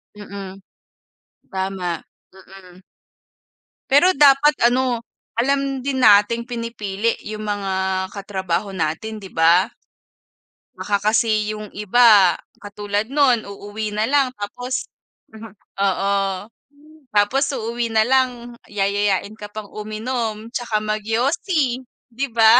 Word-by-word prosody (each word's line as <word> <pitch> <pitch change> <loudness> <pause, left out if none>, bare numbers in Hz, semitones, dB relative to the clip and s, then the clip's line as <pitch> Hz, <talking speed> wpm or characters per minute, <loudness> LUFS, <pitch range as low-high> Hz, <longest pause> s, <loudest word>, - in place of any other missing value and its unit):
Mm 195 -2 -9 0.9
tama, 190 -3 -3 0.3
mm. 190 -1 -15 1.1
Pero 290 +7 +6
dapat 285 +1 +6 0.2
ano, 250 -1 +1 0.4
alam 275 +1 +1
din 260 -1 -2
nating 210 +3 +5
pinipili 230 -3 -2
yung 215 0 -6
mga 200 -2 -2 0.4
katrabaho 195 -1 -3
natin, 175 +7 -2
'di 195 -3 -10
ba? 170 +6 +4 1.0
Baka 205 -1 0
kasi 215 -1 +1
yung 210 -1 -8
iba 210 -4 +5 0.2
katulad 205 +1 -3
nun 265 -5 +3
uuwi 205 +1 -6
na 215 - +1
lang 275 -3 +2
tapos 245 +5 -4 0.4
mhm. 220 -1 -11 0.3
Oo. 200 0 +1 1.0
Tapos 235 +8 +3
uuwi 235 0 -2
nalang 240 +1 +1
yayayain 205 0 0
ka 210 - -7
pang 215 -1 -8
uminom 220 +1 -4
tsaka 230 -4 -1
magyosi, 245 - 0 0.3
'di 275 +4 -2
ba? 225 +1 +7
215 Hz, 105 wpm, -21 LUFS, 200-245 Hz, 1.1 s, ba